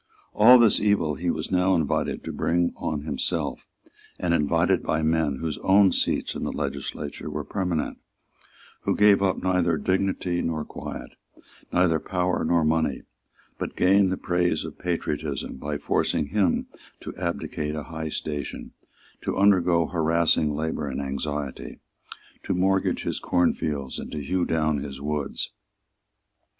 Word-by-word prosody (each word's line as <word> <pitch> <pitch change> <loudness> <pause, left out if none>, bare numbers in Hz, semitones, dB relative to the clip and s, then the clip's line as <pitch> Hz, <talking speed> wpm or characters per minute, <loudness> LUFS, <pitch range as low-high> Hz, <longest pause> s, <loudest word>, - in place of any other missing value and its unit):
All 120 +4 +8
this 115 -3 +5
evil 100 -7 +2
he 85 +3 -2
was - - -2
now 95 +1 +3
invited 80 -5 -1
to - - -5
bring 85 +1 +1
on 75 -2 -3
himself, 80 - -2 0.5
and 85 -2 +1
invited 75 -3 +2
by 80 0 -1
men 80 -2 +1
whose 80 +2 -4
own 95 0 +5
seats - - 0
in - - -6
the - - -2
legislature 75 -1 -4
were - - -4
permanent, 90 -5 -2 0.8
who - - 0
gave 105 -1 +5
up 95 -2 +2
neither 90 -3 +2
dignity 95 -1 0
nor 80 -2 -2
quiet, - - -7 0.6
neither 85 -3 +3
power 90 +1 -1
nor 85 0 +2
money, 80 -3 +1 0.6
but - - -4
gained 95 +1 +4
the 95 - -1
praise 90 0 0
of - - -9
patriotism 75 -6 -3
by 75 +2 -3
forcing 75 0 0
him 100 -5 +1 0.3
to - - -8
abdicate 85 -3 -3
a 75 - -4
high 80 0 -5
station, 75 -3 -5 0.5
to - - -2
undergo 90 -4 +4
harassing 80 -2 +2
labour 80 -1 -2
and 70 - -3
anxiety, 70 0 -4 0.6
to - - -2
mortgage 95 +1 +1
his - - -2
cornfields 75 -6 0
and - - -7
to 75 - -4
hew 90 +5 0
down 80 -2 +1
his 70 -1 -6
woods. 75 0 -3
80 Hz, 145 wpm, -25 LUFS, 75-90 Hz, 0.8 s, All